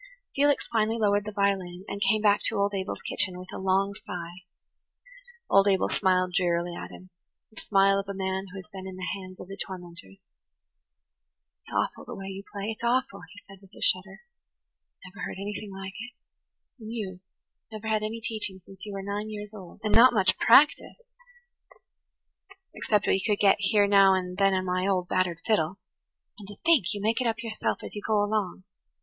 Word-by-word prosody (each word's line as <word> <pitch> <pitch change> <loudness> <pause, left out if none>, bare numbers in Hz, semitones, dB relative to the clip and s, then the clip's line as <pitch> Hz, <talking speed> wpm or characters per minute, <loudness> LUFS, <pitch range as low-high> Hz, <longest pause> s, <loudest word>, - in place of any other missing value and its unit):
Felix 285 +1 +3
finally 220 0 +2
lowered 205 -2 +2
the 215 - -4
violin, 195 -3 -1
and 200 0 -5
came 210 +2 +2
back 205 -1 +4
to 225 - -1
old 200 0 +1
Abel's 190 0 -4
kitchen 185 -2 0
with 185 0 -10
a - - -5
long 195 +1 +1
sigh. 180 -3 -8 1.1
Old 195 0 +5
Abel 195 -1 +3
smiled 185 -2 +2
drearily 175 -1 +1
at - - -7
him–the 185 +4 -16
smile 195 -1 +3
of 200 0 -6
a - - -2
man 190 0 -2
who 190 - -10
has 185 - -9
been 190 -1 -7
in 190 - -7
the 185 0 -5
hands 185 -1 -9
of - - -9
the 195 - -7
tormentors. 175 - -8 1.4
"It's - - -17
awful - - -1
the - - -7
way 195 0 -7
you 195 0 -6
play–it's 210 +3 -5
awful," 235 -5 0
he 205 - -14
said 195 -1 -14
with 195 0 -19
a - - -12
shudder. 190 +1 +1 0.8
"I - - -9
never 200 +2 -9
heard - - -5
anything 205 +1 -5
like 190 0 -7
it–and 230 0 -13
you 195 -6 -5 0.5
that 220 - -7
never - - -5
had 215 - +1
any 215 +2 -3
teaching 215 -4 -3
since 195 +1 -10
you 205 - -6
were 195 -1 -5
nine 205 +2 -3
years 210 0 -7
old, 190 -5 -11
and 215 - 0
not 240 +2 +7
much 195 -2 +3
practice, 285 - +5 1.7
except 210 -1 +1
what - - +3
you - - -4
could 210 -1 +1
get 200 -1 +5
here 205 0 +3
now 195 -1 +6
and 180 -1 -3
then 195 -1 +4
on 185 0 -1
my 185 +1 0
old, 185 -2 +1
battered 180 -2 0
fiddle. 190 -5 +1 0.6
And 200 - -10
to 205 - -10
think 320 - +5
you 205 -2 -4
make 225 +4 +1
it 250 - +1
up 225 0 -2
yourself 220 -1 -2
as - - -8
you 205 - -5
go 210 -1 +2
along! 205 -3 -2
195 Hz, 195 wpm, -27 LUFS, 185-215 Hz, 1.7 s, not